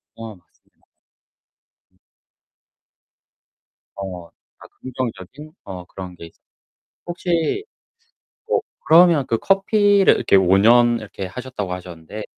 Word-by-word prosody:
어, 115 Hz, -2 st, -9 dB
맞습니다. 90 Hz, -2 st, -32 dB, 1.0 s
음. -, -, -36 dB, 2.0 s
어 90 Hz, -3 st, -7 dB
그니까 -, -, -21 dB
긍정적인 130 Hz, +3 st, -7 dB
어 90 Hz, -2 st, -8 dB
그런 90 Hz, 0 st, -10 dB
게 85 Hz, -1 st, -11 dB, 0.8 s
혹시 175 Hz, -, -2 dB, 0.9 s
어 -, -, +3 dB, 0.3 s
그러면 165 Hz, -4 st, +5 dB
그 115 Hz, -, 0 dB
커피를 200 Hz, -, +3 dB
이렇게 -, -, +3 dB
5 95 Hz, 0 st, +4 dB
년 120 Hz, +3 st, +5 dB
이렇게 100 Hz, -2 st, -7 dB
하셨다고 105 Hz, -2 st, -6 dB
하셨는데 90 Hz, +3 st, -8 dB
115 Hz, 210 characters per minute, -20 LUFS, 95-155 Hz, 2.0 s, 그러면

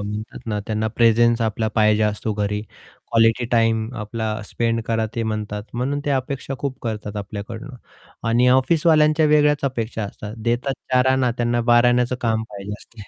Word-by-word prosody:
म्हणतात 105 Hz, +2 st, -5 dB
ना, 105 Hz, -2 st, -2 dB
त्यांना 110 Hz, 0 st, -1 dB
प्रेझेन्स 115 Hz, 0 st, +4 dB
आपला 110 Hz, 0 st, 0 dB
पाहिजे 105 Hz, -1 st, +3 dB
असतो 105 Hz, +1 st, -1 dB
घरी 105 Hz, 0 st, -1 dB, 0.5 s
क्वालिटी 115 Hz, +1 st, +3 dB
टाईम 115 Hz, -1 st, +2 dB
आपला 110 Hz, +1 st, -4 dB, 0.2 s
स्पेंड 115 Hz, +2 st, -1 dB
करा 115 Hz, -1 st, 0 dB
ते 115 Hz, -, -1 dB
म्हणतात 105 Hz, -2 st, -3 dB
म्हणून 135 Hz, +4 st, -1 dB
ते 145 Hz, -, -1 dB
अपेक्षा 135 Hz, 0 st, -2 dB
खूप 135 Hz, -1 st, -4 dB
करतात 105 Hz, -2 st, -4 dB
आपल्याकडून 105 Hz, +5 st, -6 dB, 0.6 s
आणि 120 Hz, +2 st, +4 dB
ऑफिसवाल्यांच्या 155 Hz, +3 st, +4 dB
वेगळ्याच 150 Hz, -1 st, +4 dB
अपेक्षा 115 Hz, -4 st, -2 dB
असतात, 105 Hz, +1 st, -8 dB
देतात 120 Hz, +4 st, -1 dB, 0.2 s
चार 125 Hz, 0 st, +4 dB
आणा 130 Hz, -2 st, +2 dB
त्यांना 120 Hz, 0 st, +1 dB
बाराण्याचं 120 Hz, +1 st, +4 dB
काम 110 Hz, -2 st, 0 dB
पाहिजे 100 Hz, 0 st, -7 dB
असते. 115 Hz, -, -15 dB
115 Hz, 155 wpm, -21 LUFS, 110-125 Hz, 0.6 s, प्रेझेन्स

